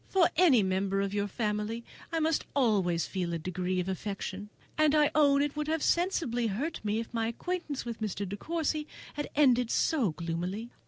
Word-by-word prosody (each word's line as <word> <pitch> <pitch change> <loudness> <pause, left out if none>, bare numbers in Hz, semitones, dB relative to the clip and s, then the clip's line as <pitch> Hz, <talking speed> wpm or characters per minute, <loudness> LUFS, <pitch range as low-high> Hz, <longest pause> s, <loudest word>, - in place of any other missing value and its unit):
For 370 -3 +4
any 305 - +5
member 190 +1 0
of 200 0 -1
your 205 0 0
family 210 +2 -2 0.3
I 330 - 0
must 320 0 +1
always 195 -10 +2
feel 180 -3 -3
a - - 0
degree 185 +2 -2
of 180 - -2
affection, 195 +1 -4 0.3
and 310 -1 +4
I 300 -1 +4
own 285 -2 +5
it 290 0 -2
would 300 0 -2
have 320 -1 0
sensibly 325 -10 +1
hurt 240 +11 -3
me 210 +1 0
if 230 +1 -6
my 225 -1 0
acquaintance 305 +3 -3
with 230 -1 -5
Mr. 205 -2 -2
De 195 - -4
Courcy 310 +3 -2 0.3
had 295 0 -4
ended 250 -5 +4
so 270 - +2
gloomily. 180 +8 -4
230 Hz, 190 wpm, -30 LUFS, 195-300 Hz, 0.3 s, any